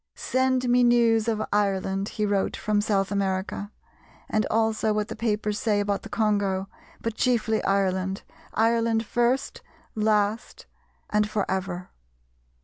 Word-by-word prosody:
"Send 260 -1 0
me 245 0 +4
news 235 -2 +4
of 220 -2 0
Ireland," 195 -1 0
he 210 - +1
wrote 200 -1 0
from 210 -1 +1
South 200 -2 0
America, 200 +1 -2 0.6
"and 215 - +1
also 220 -1 +1
what 210 0 -1
the - - -5
papers 210 -2 -1
say 210 -2 +1
about 205 -1 -1
the - - -10
Congo, 200 -3 0 0.3
but 230 - -2
chiefly 225 -2 +1
Ireland; 190 -1 0 0.3
Ireland 225 0 +2
first, 240 +5 0 0.3
last, 215 +1 0 0.5
and 210 0 +2
for 210 -2 -1
ever." 185 -1 -3
210 Hz, 135 wpm, -25 LUFS, 200-225 Hz, 0.6 s, me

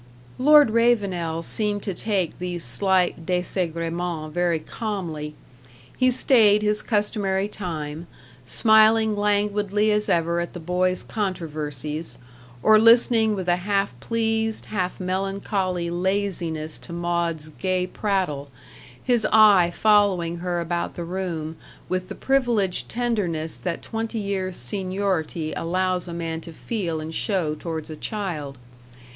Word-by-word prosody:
Lord 295 -2 +7
Ravenel 195 -8 +1
seemed 205 +2 -1
to 195 - -2
take 190 -3 -1
these 175 -1 -4
slight 180 +7 +1
desagremens 170 -2 -2
very 175 -1 +1
calmly. 160 -5 -5 0.6
He 255 0 +3
stayed 220 -5 +4
his 210 0 +1
customary 205 -3 0
time, 165 -5 -5 0.4
smiling 220 - +4
languidly 205 0 +1
as 210 0 0
ever 170 0 +1
at 170 - -4
the 175 - -6
boys' 180 +2 0
controversies, 155 - -3 0.5
or 215 0 +7
listening 230 -1 +5
with 185 -2 -4
a 175 0 +3
half 195 -2 0
pleased, 225 - -1
half 185 -4 -3
melancholy 185 -1 -2
laziness 175 -4 -2
to - - -12
Maud's 170 -2 -2
gay 185 +3 -1
prattle, 185 -9 -2 0.5
his 240 -3 +2
eye 205 -5 +7
following 190 -4 +2
her 175 0 -2
about 170 0 -2
the 175 - -4
room 170 -3 -4 0.3
with 185 0 -2
the - - -5
privileged 240 -9 +1
tenderness 195 -10 -1
that 175 -2 -4
twenty 225 0 -4
years' 195 -3 -2
seniority 185 +1 -2
allows 185 +1 -1
a - - -6
man 165 -1 -3
to 165 - -10
feel 170 -2 -3
and 160 +1 -6
show 180 -5 0
towards 160 0 -5
a - - -6
child. 160 - -4
185 Hz, 125 wpm, -24 LUFS, 170-210 Hz, 0.6 s, Lord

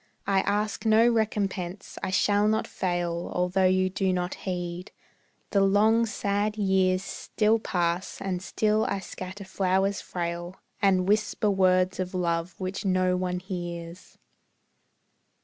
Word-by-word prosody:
I 195 -1 +2
ask 205 +2 -1
no 220 +1 +5
recompense, 200 -5 -1
I - - -2
shall 205 +2 +3
not 220 +1 +1
fail 175 -2 -2
Although 180 +1 +2
you 185 0 +3
do 190 0 0
not 180 0 -1
heed; 180 -1 -5 0.6
the 200 - +3
long, 215 +4 +4
sad 205 0 -1
years 190 -2 +2
Still 215 +2 0
pass, 175 -2 -1
and 185 -2 -3
still 215 +3 +1
I 200 - -1
scatter 190 +1 -8
flowers 190 +1 0
frail, 175 0 -4 0.3
And 185 -2 +3
whisper 210 0 +1
words 185 -1 +2
of 185 0 -3
love 170 -1 -1
which 185 0 -4
no 185 -1 +2
one 180 0 -1
hears. 175 -1 -7
185 Hz, 130 wpm, -27 LUFS, 180-205 Hz, 0.6 s, no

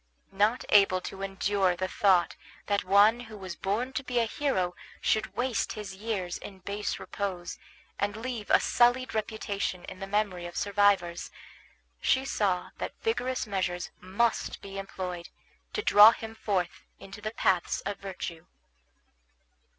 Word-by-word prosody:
Not 210 +5 +2
able 195 -3 +6
to 195 +1 -7
endure 195 -1 +1
the 185 +1 -2
thought 185 -3 +3 0.3
that 205 -1 +1
one 205 +5 +5
who 220 -3 -9
was 185 -3 -7
born 225 +9 -2
to 270 - -2
be 250 -1 -3
a 235 - +4
hero 215 -8 0 0.3
should 215 - 0
waste 245 -5 0
his 210 -2 -6
years 190 -3 -3
in 195 - -9
base 200 +2 -3
repose, 185 -4 -4 0.4
and 205 +1 -1
leave 230 -2 -5
a - - +6
sullied 245 +1 +3
reputation 205 -4 -2
in 185 - -9
the 195 - -5
memory 195 -4 -1
of 175 - -9
survivors, 200 -4 +2 0.7
she 265 0 +2
saw 190 -8 0
that - - -5
vigorous 260 - 0
measures 185 -4 -2
must 205 +5 0
be 195 0 -7
employed 180 -3 -5 0.4
to 430 - -2
draw 205 +3 +9
him 225 0 -7
forth 190 -6 -2 0.2
into 195 +1 -11
the 215 - -2
paths 190 -5 +1
of 200 +1 -4
virtue. 180 -4 -6
200 Hz, 150 wpm, -29 LUFS, 185-220 Hz, 0.7 s, draw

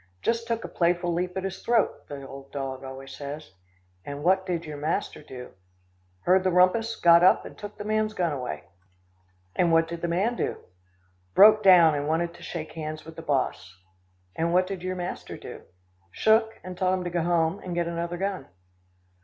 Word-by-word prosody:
"Just 230 0 0
took 230 -1 -2
a - - -4
playful 175 0 +1
leap 180 +2 -2
at 190 - -2
his 195 0 -5
throat," 235 -2 +1
the 140 -1 -8
old 135 0 -11
dog 135 -1 -5
always 135 0 -8
says. 145 +1 -7 0.5
"And 140 +4 -7
what 190 +2 +3
did 175 -2 -2
your 150 -1 -7
master 155 +6 -2
do?" 130 -4 -10 0.7
"Heard 185 +1 +3
the 190 - +2
rumpus, 185 +6 +3
got 170 0 +6
up, 185 - +5
and - - -10
took 205 0 -9
the - - -6
man's 215 0 0
gun 175 -5 0
away." 130 -3 -5 0.9
"And 175 -2 +2
what 165 0 +4
did 170 0 -6
the 170 - -1
man 195 +8 0
do?" - - -2 0.8
"Broke 215 +1 +8
down, 180 -5 +7
and 145 0 -2
wanted 170 +2 0
to - - -15
shake 160 -2 -6
hands 155 -1 -6
with 160 0 -11
the 165 - -7
boss." 130 - -2 0.6
"And 165 +1 0
what 180 +1 +3
did 190 -1 -6
your 185 +1 -3
master 180 0 -5
do?" - - -9 0.5
"Shook, 220 - +2
and 185 0 -7
told 185 0 +1
him 185 - -3
to 175 - -4
go 175 0 0
home, 170 +2 +1
and 180 -2 -6
get 170 -1 0
another 170 +1 -3
gun." 195 +1 -3
175 Hz, 195 wpm, -26 LUFS, 155-190 Hz, 0.9 s, Broke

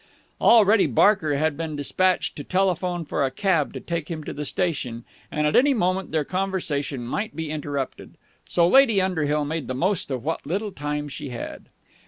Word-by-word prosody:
Already 220 -2 +6
Barker 180 -8 +3
had 155 +1 +1
been 160 0 -4
dispatched 185 +6 +1
to 145 - -6
telephone 180 -2 0
for 145 - -1
a 135 - +1
cab 165 +1 +1
to - - -4
take 170 -2 -4
him 160 -2 -5
to - - -6
the 150 - -5
station, 135 -10 -2 0.2
and 150 0 -1
at 150 - +1
any 275 +1 +5
moment 185 -2 0
their 155 -2 0
conversation 160 -9 -2
might 205 - -3
be 160 -2 -4
interrupted. 145 -3 -5 0.3
So 170 -1 +3
Lady 240 -2 +5
Underhill 150 -6 0
made 155 -1 -3
the 130 - -3
most 185 +6 0
of 130 -3 -3
what 160 - -2
little 200 +7 -2
time 145 -1 -3
she 145 0 -7
had. 120 - -7
160 Hz, 185 wpm, -24 LUFS, 145-190 Hz, 0.3 s, Already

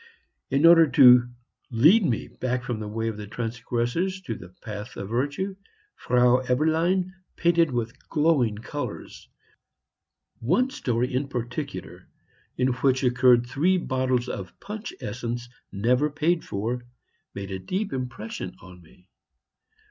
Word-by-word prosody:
In 140 +4 +2
order 165 -1 +8
to 125 -3 +7 0.4
lead 155 - +5
me 125 -10 -1
back 125 -1 -3
from 120 -2 -3
the 105 - -5
way 110 +2 -3
of 110 -2 -3
the 105 -1 -7
transgressors 120 - -2
to 135 -11 -4
the 90 -5 -10
path 105 +4 -8
of 100 - -6
virtue, 145 - -2 0.4
Frau 125 0 +3
Eberlein 160 +8 +1 0.2
painted 170 -1 +3
with 120 -2 -4
glowing 150 -8 +2
colors; 110 - -7 1.1
one 185 - +1
story 125 - -1
in 135 +2 0
particular, 125 +3 -6 0.5
in 125 +1 +2
which 130 +1 +1
occurred 125 -1 +4
three 160 +10 +1
bottles 130 -5 0
of 95 -6 -7
punch 215 - -6
essence 120 0 -4 0.2
never 125 +8 +1
paid 160 +3 0
for, 115 +5 -3 0.5
made 100 0 -6
a 95 - -4
deep 185 - -3
impression 120 -7 -5
on 90 -1 -14
me. 90 +3 -22
125 Hz, 135 wpm, -25 LUFS, 115-155 Hz, 1.1 s, order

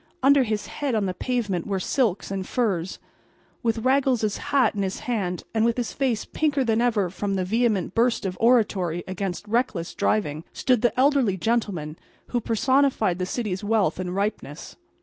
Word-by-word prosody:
Under 280 +1 +6
his 215 -4 -1
head 280 -5 -3
on 210 -2 +1
the 185 - -2
pavement 210 -6 -2
were 195 -2 -1
silks 205 -2 0
and 190 -1 -3
furs. 190 -7 -1 0.6
With 230 -1 -1
Raggles's 255 -5 +2
hat 275 -2 +3
in 205 - -2
his 190 -1 -3
hand 200 -9 -2
and 220 -1 +2
with 235 +1 +2
his 240 -3 -2
face 255 -6 -1
pinker 290 -3 0
than 225 -1 +1
ever 215 -7 +1
from 195 0 -2
a 185 - -1
vehement 215 -3 +1
burst 235 -2 +1
of 185 -1 -2
oratory 200 -8 +2
against 190 +1 -4
reckless 220 -7 -1
driving, 155 -7 0
stood 250 -4 +1
the 240 +1 +1
elderly 265 -8 +3
gentleman 185 -8 -1 0.3
who 240 - -1
personified 235 -5 +2
the 185 - -1
city's 210 -4 -3
wealth 205 -6 +1
and 180 0 -3
ripeness. 200 -7 -4
215 Hz, 170 wpm, -24 LUFS, 185-245 Hz, 0.6 s, Under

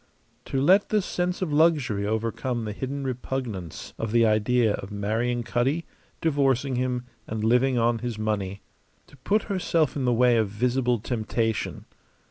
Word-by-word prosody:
To 135 - -1
let 185 +9 +4
the 215 - +3
sense 180 -1 -2
of 155 -5 -2
luxury 145 -10 +2
overcome 115 +2 -2
the 105 - -3
hidden 135 +5 -4
repugnance 125 - -4
of 115 -2 -2
the 115 0 +4
idea 110 +1 +3
of 95 - -5
marrying 110 +4 -1
Cutty, 130 +8 0 0.4
divorcing 140 -4 +1
him, 125 0 -1 0.2
and 110 0 -3
living 125 +3 +3
on 115 0 +2
his 120 -2 -4
money. 100 -3 -2 0.4
To 145 - -19
put 205 +11 +1
herself 170 -6 0
in 135 -3 -1
the 125 - +3
way 120 0 +4
of 110 -3 +1
visible 125 +3 +1
temptation. 115 -1 -2
125 Hz, 155 wpm, -26 LUFS, 110-135 Hz, 0.4 s, let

